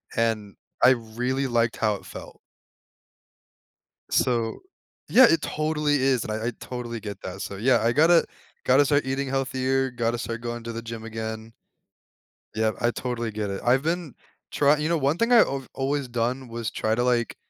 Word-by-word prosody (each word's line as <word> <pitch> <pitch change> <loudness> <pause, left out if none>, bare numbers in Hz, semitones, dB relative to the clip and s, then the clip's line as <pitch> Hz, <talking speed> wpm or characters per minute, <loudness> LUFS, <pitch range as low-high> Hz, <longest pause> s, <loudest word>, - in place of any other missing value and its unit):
and 110 -3 -1 0.3
I 125 - +9
really 125 +3 -1
liked 115 -2 +1
how 110 -2 +1
it - - -11
felt. - - -10 1.7
So 115 -3 +1 0.5
yeah, 260 - +8
it 165 - +3
totally 150 -1 0
is. 130 -3 +2
And 110 - -5
I 110 +1 -2
I 125 - 0
totally 120 -2 -6
get 100 -1 -7
that. 95 +1 -7
So 100 - -5
yeah, 120 +2 +3
I 115 - +2
gotta 165 +6 +5 0.4
gotta 135 +3 +5
start 145 -1 +2
eating 135 +1 -2
healthier, 130 0 0
gotta 120 0 -1
start 115 -1 -5
going 120 0 -5
to 115 - -5
the 115 - -5
gym 115 -1 -7
again. 110 0 -6 1.0
Yeah. 110 0 +2
I 120 - +2
totally 120 -2 -3
get 105 -1 -3
it. 100 - -4
I've 130 +3 +3
been 165 -3 -2 0.4
try 145 +1 +3
you 155 +2 -1
know, 170 - +2
one 145 +3 +1
thing 230 +2 +1
I 235 - +8
I've 135 -1 -4
always 140 0 -1
done 125 +2 -2
was 115 -1 -4
try 110 0 0
to, 120 - 0
like, 120 -2 +1
120 Hz, 180 wpm, -25 LUFS, 115-135 Hz, 1.7 s, I